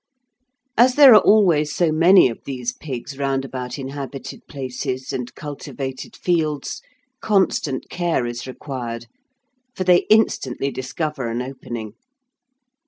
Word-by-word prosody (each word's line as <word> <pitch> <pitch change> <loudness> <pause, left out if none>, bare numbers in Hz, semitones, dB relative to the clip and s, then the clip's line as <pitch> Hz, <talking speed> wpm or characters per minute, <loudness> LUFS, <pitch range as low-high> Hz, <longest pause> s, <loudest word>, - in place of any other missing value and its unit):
As 250 +2 +5
there 280 -4 +9
are 210 - +8
always 170 -8 +4
so 170 -3 +2
many 170 +2 +6
of 115 - -7
these 125 -3 -4
pigs 135 -1 -7
round 135 -1 0
about 130 -1 -6
inhabited 135 0 -7
places 130 -1 -5
and 125 -1 -5
cultivated 135 -2 -7
fields, 155 -5 -1 0.4
constant 185 -9 +1
care 170 -8 -1
is 120 +1 -5
required, 120 -3 -6 0.7
for 185 - -2
they 180 -1 +4
instantly 140 - +2
discover 130 0 -4
an 115 +1 -2
opening. 120 -4 -7
135 Hz, 120 wpm, -21 LUFS, 130-170 Hz, 0.7 s, there